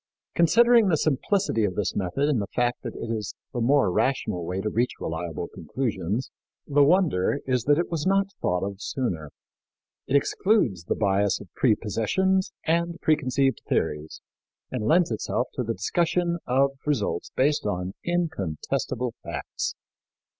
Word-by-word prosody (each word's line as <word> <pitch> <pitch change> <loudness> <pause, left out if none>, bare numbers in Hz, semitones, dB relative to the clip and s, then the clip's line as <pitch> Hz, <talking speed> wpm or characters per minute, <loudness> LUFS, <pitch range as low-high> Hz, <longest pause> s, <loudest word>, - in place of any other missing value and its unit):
Considering 230 +6 +5
the 165 -4 +3
simplicity 155 - +1
of 95 -3 0
this 105 -1 -1
method 100 +9 0
and 135 -8 +1
the 100 - -3
fact 120 0 +1
that - - -6
it 115 - -5
is 110 -3 -3 0.2
the 120 - -2
more 135 -4 +3
rational 90 -5 0
way 90 +3 -3
to 100 - -2
reach 120 +4 0
reliable 80 0 -4
conclusions, 105 - -3 0.3
the 145 0 +4
wonder 150 - +3
is 125 -2 0
that 145 0 +4
it 175 - -1
was 165 0 -1
not 195 0 +2
thought 90 0 0
of 100 0 -6
sooner. 90 - -3 0.8
It 140 - +1
excludes 140 - +2
the - - 0
bias 100 -1 +1
of 100 - -13
prepossessions 130 - +1
and 170 +1 0
preconceived 135 -3 +1
theories 75 +1 -1 0.5
and 120 -5 -2
lends 170 -2 +4
itself 120 +3 -1
to - - -2
the 115 -1 -2
discussion 170 - 0
of 135 +2 +3 0.2
results 115 -11 -1
based 145 -2 +2
on 90 -1 -2
incontestable 130 - -2
facts. - - -4
125 Hz, 150 wpm, -26 LUFS, 100-160 Hz, 0.8 s, Considering